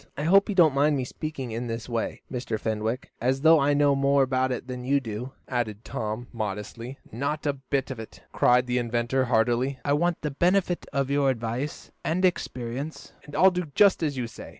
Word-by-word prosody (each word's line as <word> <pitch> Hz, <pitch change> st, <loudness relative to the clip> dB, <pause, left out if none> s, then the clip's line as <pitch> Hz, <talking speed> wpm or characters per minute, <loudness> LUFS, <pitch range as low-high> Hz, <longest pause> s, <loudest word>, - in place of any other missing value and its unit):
I 145 Hz, -, -2 dB
hope 195 Hz, +6 st, +5 dB
you 205 Hz, -, -1 dB
don't 165 Hz, -6 st, +6 dB
mind 145 Hz, +1 st, +3 dB
me 130 Hz, -, -2 dB
speaking 135 Hz, -3 st, -5 dB
in 120 Hz, +2 st, -3 dB
this 115 Hz, -1 st, -4 dB
way, 115 Hz, -2 st, -3 dB
Mr. 120 Hz, -4 st, -3 dB
Fenwick, 110 Hz, +4 st, -2 dB
as 130 Hz, +3 st, +1 dB
though 160 Hz, +1 st, +7 dB
I 145 Hz, +1 st, +3 dB
knew 145 Hz, -1 st, +4 dB
more 140 Hz, 0 st, +3 dB
about 130 Hz, 0 st, +1 dB
it 125 Hz, 0 st, -4 dB
than 125 Hz, -1 st, -5 dB
you 140 Hz, +3 st, +2 dB
do," 120 Hz, +1 st, -6 dB
added 115 Hz, -4 st, -3 dB
Tom, 110 Hz, -2 st, -4 dB
modestly. 110 Hz, +4 st, -5 dB
"Not 140 Hz, +7 st, -3 dB
a 145 Hz, -, +2 dB
bit 135 Hz, 0 st, -2 dB
of 130 Hz, -, -6 dB
it!" 110 Hz, -, -10 dB
cried 125 Hz, +1 st, +4 dB
the 125 Hz, 0 st, 0 dB
inventor 120 Hz, +2 st, 0 dB
heartily. 120 Hz, +3 st, +1 dB
"I 145 Hz, -, +2 dB
want 170 Hz, +3 st, +1 dB
the 150 Hz, -, -1 dB
benefit 180 Hz, +4 st, +1 dB
of 140 Hz, 0 st, -1 dB
your 140 Hz, -1 st, +3 dB
advice 120 Hz, +3 st, -3 dB
and 180 Hz, +3 st, +1 dB
experience, 135 Hz, -4 st, -3 dB
and 145 Hz, -, -10 dB
I'll 190 Hz, +1 st, +6 dB
do 180 Hz, -4 st, -3 dB
just 200 Hz, -3 st, +5 dB
as 145 Hz, -4 st, -1 dB
you 125 Hz, -, -1 dB
say. 115 Hz, -, -10 dB
130 Hz, 205 wpm, -26 LUFS, 120-145 Hz, -, though